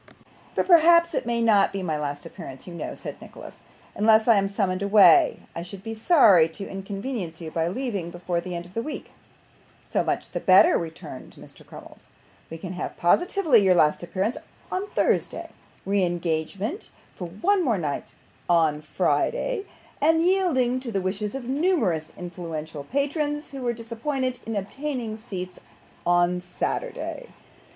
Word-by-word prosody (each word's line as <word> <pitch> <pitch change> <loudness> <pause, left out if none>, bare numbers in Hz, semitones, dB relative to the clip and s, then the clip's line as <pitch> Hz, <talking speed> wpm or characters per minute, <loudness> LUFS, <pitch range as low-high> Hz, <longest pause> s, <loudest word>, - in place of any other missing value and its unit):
'But - - +1
perhaps 340 -1 +6
it - - -2
may 235 -1 0
not 210 -3 +4
be 195 -1 -4
my 160 -4 -1
last 145 -1 -4
appearance, 130 -1 -9
you 180 - -9
know,' 170 - -5
said - - -8
Nicholas. - - -11 0.4
'Unless 220 +1 +4
I 230 -3 +6
am 195 0 +1
summoned 195 -2 -1
away, 215 - +6
I 170 - -3
should 190 +2 -9
be 225 0 -5
sorry 220 - +5
to 195 +4 -8
inconvenience 195 -2 -5
you 160 -2 -7
by 165 0 0
leaving 200 -4 -3
before 175 0 -3
the 180 0 -6
end 170 0 -5
of 175 - -16
the 230 - -1
week.' 300 +4 -7 0.7
'So - - 0
much - - -2
the - - -2
better,' 340 - +6
returned 165 -1 -6
Mr. - - -13
Crummles. - - -14 0.4
'We 165 - -7
can 185 +2 -6
have 180 - -5
positively 325 - +3
your 190 -2 +4
last 150 -3 +3
appearance, 190 +6 -2 0.3
on 375 +2 -2
Thursday - - 0 0.3
re 200 0 +1
engagement 175 - -2 0.2
for 180 - -6
one 360 - +1 0.2
night 145 -4 -4 0.3
more, 175 - +5
on 155 -2 +1
Friday 475 - 0 0.4
and, 325 +2 +4
yielding 330 -10 +2
to 255 -2 -6
the 195 -3 -1
wishes 200 +4 -3
of 270 - -4
numerous 260 - 0
influential 165 -4 -6
patrons, 295 - -2
who 275 -1 -7
were 245 -1 0
disappointed 245 +3 -3
in 225 - -3
obtaining 235 +2 -4
seats, 185 -5 -7 0.5
on 175 0 +3
Saturday. - - -4
200 Hz, 160 wpm, -25 LUFS, 175-270 Hz, 0.7 s, perhaps